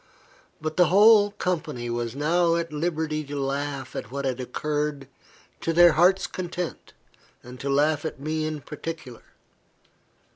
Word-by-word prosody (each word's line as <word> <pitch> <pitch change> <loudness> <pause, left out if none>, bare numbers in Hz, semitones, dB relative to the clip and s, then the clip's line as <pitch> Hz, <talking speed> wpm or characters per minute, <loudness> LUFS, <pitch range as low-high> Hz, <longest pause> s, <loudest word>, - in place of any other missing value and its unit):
But 155 +1 -4
the 180 -2 +6
whole 205 +3 +6
company 155 -11 -3
were 120 0 -2
now 165 +3 +2
at 170 -2 -3
liberty 155 -1 -1
to 145 0 -5
laugh 140 0 -3
at - - -5
what 140 +2 -4
had 130 -1 -1
occurred 145 +2 -3 0.5
to 165 - -1
their 175 +1 +7
hearts' 180 +5 +4
content, 180 -1 -5 0.5
and 125 +1 -11
to 140 - -3
laugh 145 +2 +2
at 160 - -5
me 155 +2 -2
in 155 -1 -4
particular. 150 -4 -7
155 Hz, 145 wpm, -25 LUFS, 140-170 Hz, 0.5 s, their